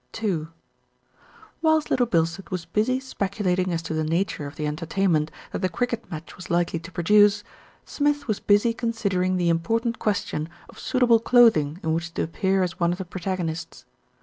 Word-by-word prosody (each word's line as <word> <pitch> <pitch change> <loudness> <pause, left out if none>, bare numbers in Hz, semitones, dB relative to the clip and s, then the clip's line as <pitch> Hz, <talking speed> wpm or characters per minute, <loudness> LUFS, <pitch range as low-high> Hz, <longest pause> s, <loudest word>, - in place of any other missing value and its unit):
II 170 -7 0 1.1
Whilst 315 -1 +2
Little 245 -1 +3
Bilstead 170 -1 0
was 180 -3 -4
busy 215 +9 0
speculating 195 -7 -1
as 165 -1 -2
to 160 - -4
the 155 0 0
nature 165 -2 -1
of 140 - -10
the 150 - -3
entertainment 160 +1 0 0.2
that - - -3
the 185 - +1
cricket 235 +3 -3
match 160 -2 -8
was 180 - -10
likely 170 -1 +1
to 170 +3 -11
produce, 205 +4 +4 0.4
Smith 290 -1 0
was 215 -3 -1
busy 205 +3 +3
considering 200 -6 -1
the 175 -1 +2
im 165 - +2
portant 230 +6 -1
question 175 -6 -1 0.2
of - - -14
suitable 245 -3 +3
clothing 220 -11 +4
in 160 0 0
which 170 +1 -3
to - - 0
appear 190 +3 0
as 180 -1 -4
one 170 -1 +2
of 175 - -2
the 190 - -5
protagonists. 175 -2 -4
185 Hz, 175 wpm, -24 LUFS, 165-220 Hz, 1.1 s, produce